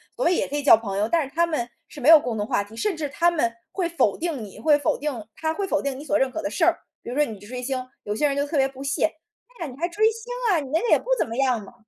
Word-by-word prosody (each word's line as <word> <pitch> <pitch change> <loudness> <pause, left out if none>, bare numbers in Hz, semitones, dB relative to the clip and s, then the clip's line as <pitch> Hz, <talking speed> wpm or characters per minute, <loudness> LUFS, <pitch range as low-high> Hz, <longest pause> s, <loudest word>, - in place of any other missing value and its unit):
所 - - -2
谓 360 - +4
也 - - 0
可 290 - -5
以 290 - -1
交 280 - +8
朋 200 -3 -4
友， 210 +2 0
但 335 -1 +3
是 275 +4 -14
他 340 - +4
们 305 -8 -2 0.2
是 295 - -10
没 265 - -1
有 325 0 +11
共 245 -5 -3
同 205 0 -2
话 200 - +1
题， 205 +2 -16
甚 410 - 0
至 305 -2 -3
他 335 +5 +3
们 295 -9 0 0.2
会 355 -3 -1
否 335 - +1
定 325 -6 -3
你 200 - -13
会 300 -2 +4
否 285 - 0
定 275 -7 -4
他 315 0 -1
会 390 +3 -3
否 300 - +1
定 275 -1 -3
你 295 - -9
所 305 - +2
认 265 -1 +1
可 320 - -4
的 300 - -2
事 330 - -1
儿。 340 0 +3 0.2
比 - - -7
如 250 - -4
说， 295 - +4
你 220 -6 -7
去 205 - -14
追 250 +3 -6
星， 255 0 -3 0.2
有 210 0 -3
些 295 - +1
人 280 - -1
就 285 - +1
特 310 - -4
别 270 - +4
不 270 0 -11
屑： 275 0 +1 0.5
"哎 335 - -3
呀， - - -8
你 250 - -13
还 340 +4 0
追 420 +5 +1
星， 460 +2 -8 0.2
啊， 340 - +3
你 275 - -6
那 320 - +3
个 475 - -1
也 - - +6
不 - - -16
怎 - - +1
么 230 - -5
样 255 -4 +2
嘛。 200 - -13
290 Hz, 365 characters per minute, -24 LUFS, 250-330 Hz, 0.5 s, 有